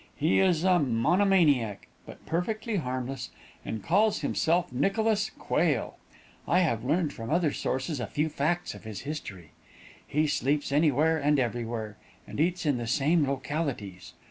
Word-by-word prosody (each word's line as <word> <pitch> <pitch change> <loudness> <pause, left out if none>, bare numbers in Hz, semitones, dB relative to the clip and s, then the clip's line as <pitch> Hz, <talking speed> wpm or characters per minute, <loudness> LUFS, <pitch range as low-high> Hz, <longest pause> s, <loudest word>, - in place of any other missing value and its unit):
He 155 +3 +2
is 180 -4 +3
a 185 -1 +4
monomaniac, 145 - +2 0.2
but - - -12
perfectly 215 +6 -2
harmless, 130 -3 -4 0.3
and 110 -3 -5
calls 205 +5 +2
himself 170 -4 0
Nicholas 215 - +1
Quail. - - 0 0.5
I 180 +2 +4
have 120 -10 0
learned 155 +4 0
from 115 -1 -7
other 165 -2 +2
sources 135 +3 -2
a 120 - -3
few 150 +7 -1
facts 160 +4 -1
of - - -12
his 110 -2 -7
history. 100 - -7 0.6
He 155 +2 +1
sleeps 145 0 0
anywhere 155 +2 +3
and 145 0 +2
everywhere, 115 -3 -3 0.3
and - - -7
eats 170 +2 +1
in 140 -5 +1
the 120 - -4
same 145 +5 +2
localities. 130 - -4
150 Hz, 145 wpm, -28 LUFS, 125-175 Hz, 0.6 s, a